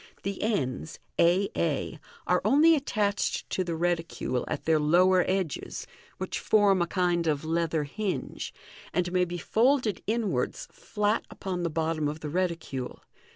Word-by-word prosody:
The 195 0 -3
ends, 155 - -1 0.2
a 180 +4 +4
a, - - -1 0.3
are - - +2
only 315 +4 +6
attached 210 -9 0
to 185 - 0
the 170 -2 -3
reticule 165 -6 -1
at - - -4
their 160 -1 +4
lower 180 +4 +4
edges 185 -6 -2 0.3
(which - - -3
form 200 -3 +4
a 170 - +1
kind 175 -2 +1
of 150 -1 0
leather 165 -1 0
hinge), 195 +7 -4 0.4
and 180 -1 0
may 180 0 +3
be 175 0 -5
folded 235 - +2
inwards 210 - -1
flat 210 +1 -1
upon 185 -2 -4
the 170 - 0
bottom 160 -1 0
of 150 +1 -4
the 150 - -4
reticule. 165 -7 -3
175 Hz, 150 wpm, -28 LUFS, 160-200 Hz, 0.4 s, only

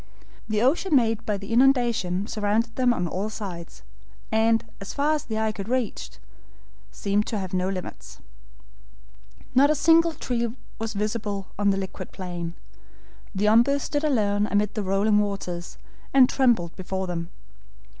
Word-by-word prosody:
The 215 +1 +1
ocean 300 +5 +2
made 225 -3 +2
by 210 -2 0
the 200 +3 -6
inundation 235 -7 +3
surrounded 220 +2 -1
them 250 -1 +3
on 180 -7 -1
all 190 +5 -3
sides, 175 - -8 0.5
and, 225 +1 +3 0.2
far 285 +9 0
as 300 - -2
the 220 -1 -3
eye 220 0 +1
could 200 0 -7
reach, 235 - -2 0.7
seemed 200 - -1
to 220 - -2
have 190 -1 -5
no 185 0 0
limits. 65 - -7 1.3
Not 275 +3 +5
a 305 - +3
single 330 +2 +4
tree 235 -5 -2 0.2
was 225 0 -3
visible 205 -1 -3
on 205 -1 +3
the 195 - +2
liquid 190 -1 -6
plain; 175 -3 -5 0.8
the 200 +2 0
OMBU 235 +6 +5
stood 290 +1 -2
alone 210 -8 +2
amid 205 0 +1
the 215 - -2
rolling 200 +2 +2
waters, 190 -4 -3 0.4
and 260 -2 +8
trembled 235 -12 +2
before 190 0 -3
them. 170 -2 -4
210 Hz, 150 wpm, -25 LUFS, 190-240 Hz, 1.3 s, and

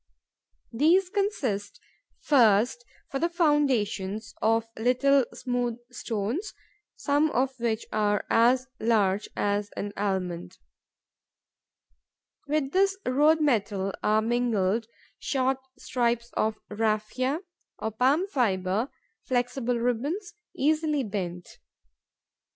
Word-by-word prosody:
These 345 +9 +3
consist, 275 - -2 0.4
first, 240 -3 +4 0.3
for 275 - -2
the 335 - +1
foundations, 250 - 0
of 225 +1 +2
little 255 +3 +3
smooth 245 -2 -2
stones, 235 - -3 0.4
some 290 +1 +2
of 260 -1 -1
which 230 -1 -1
are 205 -1 +1
as 245 +3 +4
large 210 -3 +1
as 205 0 0
an 205 0 -4
almond. 185 -3 -3 1.9
With 290 -2 0
this 390 +1 +2
road 300 +5 +4
metal 200 -8 +1
are 215 +1 +2
mingled 225 -3 +1 0.3
short 265 -1 0 0.2
strips 235 -1 -1
of 215 0 0
raphia, 225 - 0 0.4
or 220 - -3
palm 265 - +2
fibre, 215 - 0 0.4
flexible 245 -1 0
ribbons, 280 - -2 0.2
easily 305 0 +1
bent. 180 -5 -5
240 Hz, 95 wpm, -27 LUFS, 210-280 Hz, 1.9 s, first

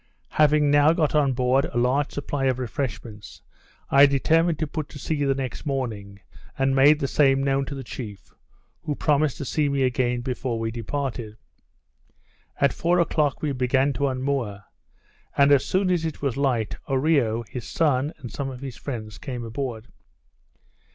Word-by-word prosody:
Having 150 -1 +3
now 145 +2 +5
got 160 -3 +1
on 145 -3 +3
board 125 +2 +2
a - - -5
large 130 +4 +1
supply 145 -1 -3
of 130 -2 +1
refreshments, 110 - -5 0.5
I 140 +1 +8
determined 160 +4 +2
to 155 - -1
put 155 0 -5
to - - -10
sea 145 +1 -2
the 135 -1 +2
next 130 -2 -5
morning, 110 -8 -4 0.4
and 135 0 +1
made 145 +3 +6
the 140 - -1
same 135 -1 +3
known 135 0 +1
to 140 - -6
the 135 - -6
chief, 105 -5 -9 0.5
who 150 - -3
promised 150 -4 +1
to 140 - -5
see 150 +2 0
me 140 -1 +1
again 125 -1 0
before 125 -1 -3
we 115 0 -2
departed. 115 -2 -4 1.2
At 140 - +3
four 175 +2 +1
o'clock 155 -5 +1
we 150 - 0
began 130 +2 +1
to 140 +1 0
unmoor; 130 -6 -2 0.7
and 140 0 +5
as 140 -2 +5
soon 185 0 +1
as 175 -2 +1
it 160 -2 -4
was 140 -4 -1
light, 125 -6 0
Oreo, 135 -5 +2
his 120 +2 -7
son, 145 -3 +1
and 120 - -9
some 140 -1 -4
of 130 -1 -8
his 135 -3 -7
friends, 110 -6 -6
came 125 -4 -5
aboard. 115 -1 -5
135 Hz, 170 wpm, -24 LUFS, 125-145 Hz, 1.2 s, I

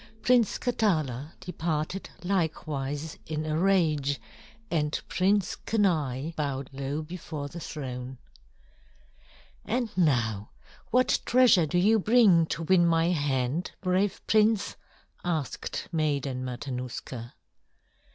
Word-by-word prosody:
Prince 245 -4 +4
Katala 155 - 0
departed 170 +1 -3
likewise 155 -5 -2
in 155 0 -3
a 155 0 -1
rage, 155 -7 +2 0.5
and 150 -3 0
Prince 195 0 +1
Kenai 160 - 0
bowed 140 -3 -3
low 140 +3 -3
before 155 -3 -6
the 170 +4 -8
throne. 130 -5 -6 1.5
"And 235 -1 -2
now 115 - +1 0.4
what 250 +2 +3
treasure 235 -10 +5
do 165 - 0
you 215 +5 +4
bring 205 -7 +5
to 165 - -3
win 175 +1 +4
my 165 0 +3
hand, 145 0 -1
brave 190 +1 0
prince?" 215 -1 +3 0.5
asked 160 -6 -3
Maiden 140 -5 -1
Matanuska. 125 -2 -5
160 Hz, 105 wpm, -28 LUFS, 140-185 Hz, 1.5 s, treasure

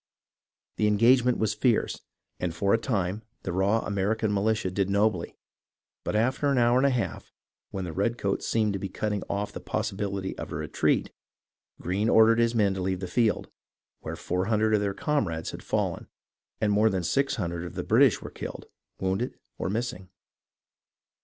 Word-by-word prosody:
The 105 - +2
engagement 120 +4 +4
was 110 -2 +1
fierce, 120 -1 +1 0.4
and 85 -2 -2
for 100 +4 +2
a 115 - +4
time 100 -4 -1 0.2
the 95 - -3
raw 100 +5 +2
American 105 +2 0
militia 105 -1 +1
did 100 +1 0
nobly, 100 -3 +1 0.7
but - - -2
after 130 +6 +1
an 140 - +2
hour 120 0 +4
and 140 - +4
a - - +4
half, 125 -3 -3 0.4
when 95 - -4
the 85 - -5
redcoats 100 +1 -1
seemed 110 -2 +1
to 100 - -2
be 95 - -4
cutting 105 -2 -2
off 100 +1 -2
the - - -5
possibility 100 -1 -3
of - - -6
a - - -4
retreat, - - 0 0.7
Greene 100 +5 0
ordered 115 +1 +6
his 115 0 +2
men 100 -3 +3
to 95 - -4
leave 95 0 -1
the 95 - -4
field, 110 +3 +1 0.5
where - - -5
400 105 +4 0
of 105 - +4
their 100 -1 -1
comrades 95 - -1
had - - -8
fallen - - -2 0.5
and 105 -1 +2
more 105 +2 +4
than 95 -3 -1
600 90 -6 0
of 90 - -7
the - - -3
British - - +4
were - - -7
killed, - - -7 0.3
wounded, 95 +6 -1 0.2
or - - -1
missing. 105 -4 -3
105 Hz, 170 wpm, -27 LUFS, 95-115 Hz, 0.7 s, ordered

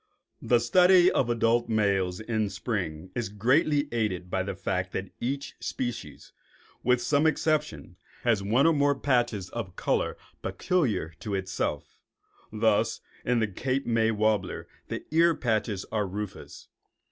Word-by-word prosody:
The 120 - +3
study 180 +9 +5
of 120 - +1
adult 115 0 +2
males 100 -4 +1
in 110 -2 -1
spring 95 -5 -4
is 120 -5 -3
greatly 145 +8 +2
aided 95 -6 -2
by 95 - +1
the 95 0 -4
fact 95 -1 -2
that 95 -1 -4
each 135 +3 -3
species, 120 -2 -5 0.5
with 125 0 +3
some 145 +4 +3
exceptions, 150 - -1 0.3
has 115 -5 +2
one 115 +8 +2
or 165 - +5
more 145 -1 +3
patches 120 -9 0
of 105 -6 -5
color - - 0 0.2
peculiar 120 - 0
to 105 -3 -3
itself. 95 -1 -3 0.5
Thus - - +1 0.2
in 120 -1 +1
the 110 - +2
Cape 130 +7 -2
May 115 -1 +2
warbler 110 -3 0 0.2
the - - -5
ear 165 +1 +4
patches 110 -4 -1
are 105 -2 0
rufous. 100 +1 -7
115 Hz, 140 wpm, -27 LUFS, 100-130 Hz, 0.5 s, study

